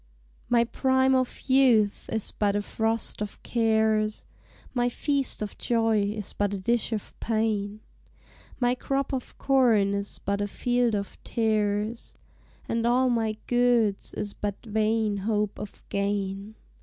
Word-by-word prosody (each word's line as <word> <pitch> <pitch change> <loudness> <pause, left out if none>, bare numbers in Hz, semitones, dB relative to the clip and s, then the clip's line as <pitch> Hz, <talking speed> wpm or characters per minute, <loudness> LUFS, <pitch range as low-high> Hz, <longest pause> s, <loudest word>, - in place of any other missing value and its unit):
] - - -33
My 235 - +5
prime 260 +2 +2
of 255 -1 0
youth 250 -6 +3
is 220 -2 -2
but 205 -1 0
a 205 - 0
frost 225 0 0
of 210 -1 -6
cares, 220 -2 +1 0.5
My 245 -1 +1
feast 275 -2 0
of 210 - -6
joy 225 -2 +2
is 205 0 -3
but 205 0 -1
a - - -4
dish 235 +4 0
of 215 -3 -4
pain, 215 -2 -1 0.8
My 245 -1 +3
crop 275 +2 -2
of 260 -2 -5
corn 235 -7 +3
is 200 0 -3
but 200 +1 -2
a 205 - 0
field 245 +1 +1
of 200 -1 -5
tares, 215 0 -1 0.5
And 230 0 0
all 250 +1 +3
my 220 -2 0
goodes 240 -4 +2
is 205 -1 -4
but 205 +2 -5
vain 215 -1 +1
hope 210 0 -1
of 210 - -9
gain. 200 +1 -2
220 Hz, 145 wpm, -27 LUFS, 205-240 Hz, 0.8 s, My